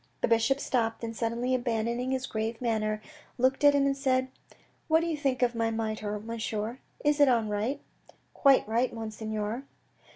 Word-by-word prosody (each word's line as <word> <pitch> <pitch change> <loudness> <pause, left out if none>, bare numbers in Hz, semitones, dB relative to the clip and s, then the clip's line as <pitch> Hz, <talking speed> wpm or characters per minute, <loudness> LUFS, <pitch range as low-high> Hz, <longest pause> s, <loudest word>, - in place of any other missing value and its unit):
The - - +2
bishop 230 +4 +3
stopped, 230 -4 -1
and 225 0 -4
suddenly 235 +3 -1
abandoning 240 0 -1
his 265 0 -1
grave 225 -1 -3
manner 215 -3 -1 0.3
looked 260 +3 +2
at 290 0 +7
him 280 -1 +3
and 275 0 +2
said: 260 -1 +1 0.3
" - - -35
What 320 +1 +4
do - - -1
you 335 -2 -1
think 270 -4 0
of 245 -1 +2
my 230 -1 0
mitre, 215 -2 -3
monsieur, 225 +1 -4 0.3
is 295 0 +3
it 285 - +7
on 230 -4 +2
right? 210 +7 -1 0.2
" - - -25
" - - -41
Quite 275 -5 +5
right, 235 +3 +1
Monseigneur." 220 0 -4
235 Hz, 190 wpm, -29 LUFS, 220-260 Hz, 0.3 s, at